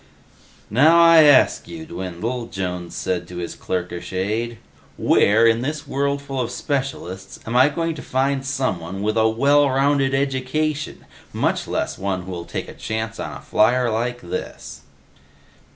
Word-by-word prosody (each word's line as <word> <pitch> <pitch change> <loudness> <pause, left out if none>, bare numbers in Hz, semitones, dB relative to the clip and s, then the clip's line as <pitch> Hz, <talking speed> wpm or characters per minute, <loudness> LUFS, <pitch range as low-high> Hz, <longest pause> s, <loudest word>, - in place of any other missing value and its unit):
"Now 155 +9 +6
I 165 -2 +8
ask 145 -3 +5
you, 165 -1 -8
Dwindle," 115 - -4
Jones 90 -3 -5
said 90 -1 -2
to 90 - -9
his 85 -1 -4
clerkish 90 -1 -4
aide, 110 +5 -2 0.4
"where, 110 +3 +4
in 115 0 +3
this 150 +3 -3
worldful 140 -1 -2
of 120 - -2
specialists, 125 - -4
am 115 - -4
I 130 +3 +6
going 165 +2 -2
to 155 - -8
find 135 +1 0
someone 95 -9 -3
with 110 +1 0
a 110 0 +4
well 140 +5 +3
rounded 135 0 +2
education? 140 +3 -2 0.3
Much - - 0
less - - -2
one 95 -2 -2
who'll 90 -2 -6
take - - -5
a - - -9
chance 110 0 -4
on - - -5
a - - -13
flier 120 +2 +2
like 120 +2 -2
this?" 85 -4 -6
125 Hz, 150 wpm, -21 LUFS, 95-140 Hz, 0.4 s, I